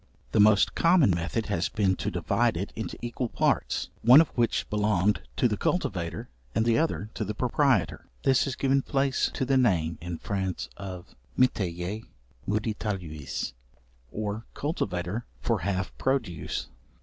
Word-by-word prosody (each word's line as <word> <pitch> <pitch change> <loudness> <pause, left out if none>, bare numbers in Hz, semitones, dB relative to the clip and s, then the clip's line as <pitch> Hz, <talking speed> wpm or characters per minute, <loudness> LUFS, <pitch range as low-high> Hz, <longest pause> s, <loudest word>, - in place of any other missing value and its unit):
The 110 - +2
most 105 0 +5
common 165 - +4
method 85 +6 -1
has 90 -4 -1
been 95 -3 +1
to - - -2
divide - - +1
it - - -4
into - - -5
equal 120 +1 -2
parts, - - 0
one 125 +5 +9
of 165 - +4
which 120 -2 0
belonged 105 -3 +1 0.2
to - - +4
the 105 -3 -1
cultivator 95 - -1 0.3
and 110 - +2
the 115 -1 +3
other 110 -10 -1
to - - -3
the 105 +1 -4
proprietor. 125 - +1 0.2
This 130 -2 +4
has 135 -3 -3
given 135 0 +2
place 135 0 +1
to 130 - 0
the 135 +1 +3
name 85 -10 +2
(in 85 0 -4
France) 95 -1 -3
of 95 -3 -8 0.2
metayer 95 -4 0 0.5
(medietarius) 95 - -3 0.6
or 105 +1 -4
cultivator 105 - -2
for 115 -3 0
half 95 +1 -2
produce. 120 - -1
105 Hz, 150 wpm, -27 LUFS, 90-125 Hz, 0.6 s, one